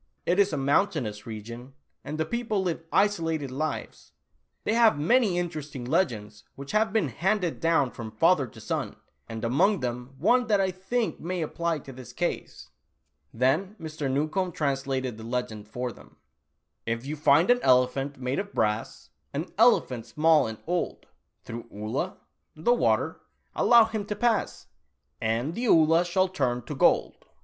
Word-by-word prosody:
It 180 +3 +2
is 200 0 +4
a 150 - -2
mountainous 135 - 0
region, 115 +4 -8 0.3
and 150 +2 -5
the 160 - 0
people 220 0 -1
live 170 -2 -2
isolated 165 -8 +1
lives. 155 +4 -5 0.5
They - - 0
have 230 -6 +5
many 200 - +3
interesting 155 -7 -4
legends 110 - -1
which 140 0 -8
have 215 +1 +2
been 205 -9 +1
handed 180 - -1
down 165 -6 +2
from 115 -2 -7
father 140 +5 +3
to - - -14
son, - - -3 0.3
and 115 0 -4
among 175 - +2
them 125 +1 -4
one 245 - +3
that 210 -2 +3
I 190 -1 +1
think 210 +6 -2
may 175 0 -3
apply 170 +1 -2
to 135 - -9
this 125 -2 -11
case." - - -4 0.6
Then 155 - +1
Mr. 155 -3 -4
Newcombe 155 +7 -1
translated 135 -5 -2
the - - -8
legend 115 -3 -4
for 125 +3 -4
them: - - -17 0.4
" - - -52
If 115 - -13
you 150 +2 -3
find 155 +6 +4
an 245 0 +3
elephant, 130 +2 +2
made 130 +1 -2
of 200 0 -6
brass, 105 0 -2 0.2
An 155 +5 -3
elephant 130 - +3
small 155 -2 +3
and 110 0 -6
old 175 +1 -2 0.2
— - - -51
Through 115 0 -7
'Oolah 105 +2 -3
' - - -51
— - - -50
the 165 +10 +2
water 245 - +1 0.2
— - - -43
allow 235 -2 +6
him 220 -2 -4
to 210 - -3
pass 225 0 0 0.6
And 115 +7 -1
the 240 +7 -3
Oolah 165 -1 +5
shall 185 +2 +2
turn 130 -10 -1
io 150 - -4
eold 130 - +3
155 Hz, 170 wpm, -27 LUFS, 125-190 Hz, 0.6 s, allow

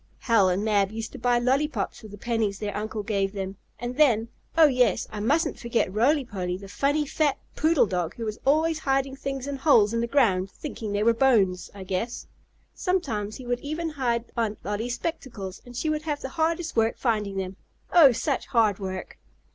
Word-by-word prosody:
Hal 225 -6 +4
and 190 +4 0
Mab 200 -2 +2
used 225 0 -5
to - - -9
buy 245 +1 +2
lollypops 260 -1 0
with 215 - -11
the 205 - -9
pennies 220 -3 -1
their 205 -1 -4
uncle 215 0 -3
gave 200 -2 -1
them. 195 -1 -5 0.2
And 245 +1 -5
then 235 -7 +4 0.3
Oh, 325 - +8
yes, 250 -8 +2
I 210 - -5
mustn't 285 +10 +1
forget 235 -5 0
Roly 265 +6 +3
Poly, 180 -5 -3
the 195 +1 -10
funny, 285 +8 0
fat, 290 0 +1 0.2
poodle 315 -3 +3
dog 180 -4 -2
who 230 - -5
was 215 -1 -4
always 315 +3 +2
hiding 270 0 0
things 275 -1 -4
in 285 -1 -4
holes 235 -7 +4
in 230 - +1
the 235 - -1
ground, 205 -8 +2
thinking 225 -2 -6
they 205 +1 0
were 230 +1 +5
bones, 220 -8 +2
I 195 - -7
guess. 190 +6 -3 0.5
Sometimes 220 - -1
he 255 - -9
would 245 0 -1
even 310 +5 -3
hide 245 -6 -1
Aunt 220 -3 -1
Lolly's 225 +4 -2
spectacles 235 - -5
and 245 0 -9
she 315 - -1
would 305 0 0
have 300 -2 -3
the 265 - -5
hardest 325 +1 -1
work 225 0 +2
finding 210 -5 -1
them. 190 0 -4 0.4
Oh, 315 -6 +8
such 245 +4 -1
hard 220 -6 +2
work! 190 -1 -6
235 Hz, 200 wpm, -26 LUFS, 205-275 Hz, 0.5 s, Oh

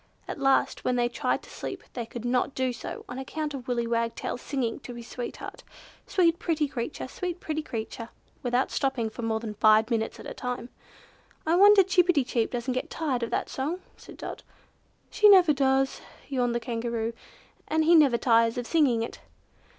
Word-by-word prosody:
At - - -5
last 270 -1 +2
when 250 - +1
they 240 -1 +2
tried 240 - -1
to - - -14
sleep, - - -6
they 235 -3 -4
could 240 0 -7
not 250 +2 0
do 260 -1 0
so - - -7
on 250 - -6
account 300 +2 -4
of 255 -3 -7
Willy 240 -2 0
Wagtail's 230 +1 -2
singing 255 -5 -2
to 245 - -9
his 235 0 -9
sweetheart, 245 -1 -7 0.4
"Sweet 340 -3 +3
pretty 310 -3 0
creature! 255 0 -4
Sweet 355 +5 -4
pretty 310 -2 -3
creature!" 230 -3 -6 0.3
without 245 +1 0
stopping 260 -5 0
for 240 - -7
more 225 -1 0
than 220 -2 -5
five 215 +2 +4
minutes 225 -1 -1
at - - -10
a - - -6
time. 250 -1 -4 0.8
"I 320 - +2
wonder 405 +1 +8
Chip 360 -1 +3
pi 355 - +5
ti 285 -4 +3
chip 240 -2 0
doesn't 245 +1 -2
get 255 - -3
tired 280 -7 -1
of 235 - -2
that - - -1
song," 310 +8 -3
said - - -13
Dot. - - -7 0.7
"She 425 -1 +6
never 365 -6 +7
does," 270 -1 +1 0.3
yawned 245 -3 0
the - - +1
Kangaroo, 230 -1 -2 0.5
"and 315 +1 +2
he 330 +2 +5
never 285 -7 +6
tires 230 0 +3
of 245 - -2
singing 255 -7 +3
it." 230 - -7
250 Hz, 195 wpm, -27 LUFS, 235-300 Hz, 0.8 s, wonder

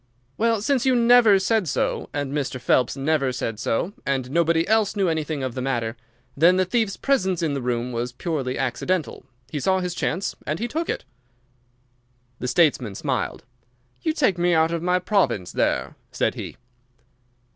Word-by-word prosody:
"Well, 225 -2 +1
since 270 -1 +1
you 260 -1 +3
never 235 -3 +6
said 190 0 +1
so, - - -1
and 145 -1 -3
Mr. 135 -3 -2
Phelps 125 +2 +2
never 140 -1 +1
said 115 -4 -4
so, 165 - -1
and 135 -2 -2
nobody 165 +1 +2
else 220 -1 +2
knew 195 -2 +1
anything 155 -3 -2
of 130 -2 -3
the 130 - -4
matter, 120 -3 -1 0.4
then 170 +5 +5
the 185 - +3
thief's 215 0 0
presence 190 -11 +1
in 155 -3 0
the 140 - -2
room 125 0 -2
was 120 +1 -3
purely 130 -1 -3
accidental. 155 +6 -2 0.2
He 150 - -2
saw 190 +7 +2
his 180 -1 -3
chance 185 +2 -2
and 150 +2 -1
he 235 - -2
took 325 +6 -3
it." - - -3 1.3
The 125 - -3
statesman 125 - +2
smiled. - - -2 0.6
"You 320 - +1
take 255 - +1
me 175 0 +3
out 160 +1 +3
of 170 -1 -2
my 180 +1 +2
province 175 - 0
there," - - 0 0.2
said - - 0
he. - - -7
165 Hz, 175 wpm, -23 LUFS, 130-195 Hz, 1.3 s, never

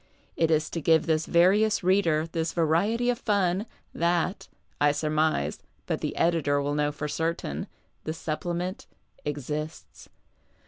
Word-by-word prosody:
It 165 - +2
is 155 -1 +1
to 165 - -3
give 160 +1 +4
this 160 -1 +1
various 200 +5 +4
reader 175 -4 +3
this 165 0 -2
variety 200 +10 +2
of 240 - -4
fun 200 0 +1 0.3
that 170 +2 0 0.4
(I 145 -1 +5
surmise, 155 - 0 0.3
but - - -2
the - - -3
editor 160 -4 +2
will 145 +1 -1
know 150 0 +1
lor 150 - -1
certain) 165 +3 -2 0.4
the 155 - -3
Supplement 175 +8 -3 0.4
exists. 150 +2 -5
165 Hz, 135 wpm, -27 LUFS, 155-180 Hz, 0.4 s, I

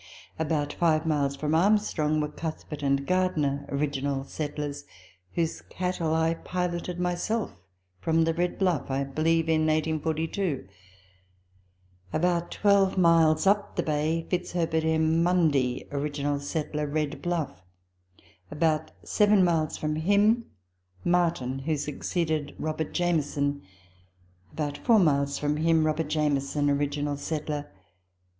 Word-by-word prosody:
About 150 -2 -1
five 160 -2 +2
miles 145 -3 +1
from 150 +2 -2
Armstrong 165 -4 +2
were 150 - 0
Cuthbert 155 0 -6
and 140 -1 +1
Gardiner 150 -6 0
(original 140 -1 -1
settlers), 145 0 -4 0.5
whose 165 -1 -1
cattle 175 -3 -1
I 160 0 +2
piloted 180 0 -3
myself 180 - -1 0.5
from 160 - +2
the 165 0 +1
Red 175 +2 -1
Bluff, 175 -9 0
I 135 +1 0
believe 160 +4 +1
in 160 -1 +3
1842; 155 - -1 1.4
about 175 +1 +1
twelve 200 -2 +3
miles 165 -2 +4
up 200 +1 +2
the - - 0
Bay, 155 +2 0
Fitz 180 -1 -2
herbert 160 -2 0
M. 160 +1 +2
Mundy 155 -8 +2
(original 145 0 -1
settler), 150 0 -3
Red 150 0 -2
Bluff; 165 - -2 0.9
about 155 0 0
seven 210 -2 +4
miles 165 -3 +1
from 155 0 -2
him 205 +7 +3 0.6
Martin, 170 -7 +1
who 150 +3 -1
succeeded 155 +1 -2
Robert 155 0 -3
Jamieson; 145 -5 0 0.9
about 145 -2 -3
four 235 -3 +4
miles 140 -6 +2
from 150 0 0
him 160 0 +3
Robert 155 0 0
Jamieson 145 -1 +1
(original 145 0 -1
settler). 150 0 -4
155 Hz, 120 wpm, -27 LUFS, 145-170 Hz, 1.4 s, miles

